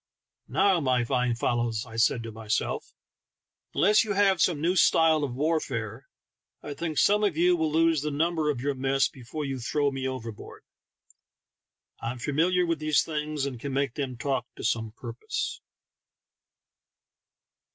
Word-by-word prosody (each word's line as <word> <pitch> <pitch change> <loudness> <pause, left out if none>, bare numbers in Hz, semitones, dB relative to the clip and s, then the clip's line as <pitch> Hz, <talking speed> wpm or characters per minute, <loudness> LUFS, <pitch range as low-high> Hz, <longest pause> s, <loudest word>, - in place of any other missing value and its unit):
"Now, 195 -3 +3
my 130 -4 +1
fine 125 0 0
fellows," 120 -1 -1
I 110 -2 -11
said 115 0 +2
to 115 - -6
myself; 110 -1 -3 0.8
"unless 210 +5 +5
you 215 -2 -2
have 195 -2 +3
some 170 -5 +2
new 170 +4 +1
style 160 -3 +4
of 130 -4 -3
warfare, 135 -6 -2 0.6
I 145 - -5
think 155 +1 -4
some 210 +1 +4
of 195 -7 +1
you 175 +1 +4
will 160 -2 0
lose 165 -1 +3
the 150 - -2
number 160 +1 0
of 135 -5 -1
your 140 +2 0
mess 135 +1 +1
before 140 +2 -7
you 135 -1 -3
throw 140 +4 0
me 135 -1 -3
overboard. 115 -5 -7 1.4
I'm 120 +2 -3
famil 150 +8 +1
iar 180 -1 +2
with 165 -2 0
these 155 -1 +2
things, 150 -2 -3
and 130 -4 -5
can 140 +2 -5
make 135 -2 0
them 130 -4 -4
talk 130 -2 -2
to - - -9
some 110 -1 -1
purpose." 120 0 -5
140 Hz, 160 wpm, -27 LUFS, 120-160 Hz, 1.4 s, unless